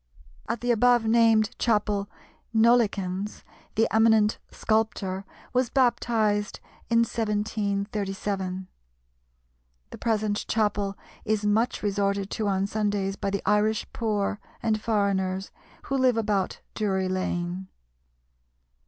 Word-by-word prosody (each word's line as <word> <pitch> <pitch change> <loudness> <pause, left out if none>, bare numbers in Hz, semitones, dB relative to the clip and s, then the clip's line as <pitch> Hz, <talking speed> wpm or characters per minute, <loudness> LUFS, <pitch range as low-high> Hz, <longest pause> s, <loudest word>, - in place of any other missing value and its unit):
At 235 - -2
the 245 0 +1
above 240 0 +4
named 225 -1 +4
chapel 210 -3 +1 0.5
Nollekens, 210 -4 +2 0.3
the 225 +1 +3
eminent 220 -1 +4
sculptor, 205 -3 -1 0.3
was 250 -1 +2
baptized 220 -5 +1 0.3
in 230 0 +4
1737. 200 -3 -2 1.2
The - - -8
present 215 -2 0
chapel 205 -2 0 0.3
is 215 -1 0
much 220 +4 +1
resorted 200 -1 0
to 215 - -1
on 195 -1 +1
Sundays 205 -2 -1
by 200 - -2
the 200 0 -2
Irish 210 +1 +2
poor 210 -2 -1 0.2
and 215 -2 +1
foreigners, 195 -3 0 0.3
who 275 - -1
live 255 -2 +3
about 205 -4 -1
Drury 190 -3 0
Lane. 185 0 -2
210 Hz, 105 wpm, -26 LUFS, 200-225 Hz, 1.2 s, above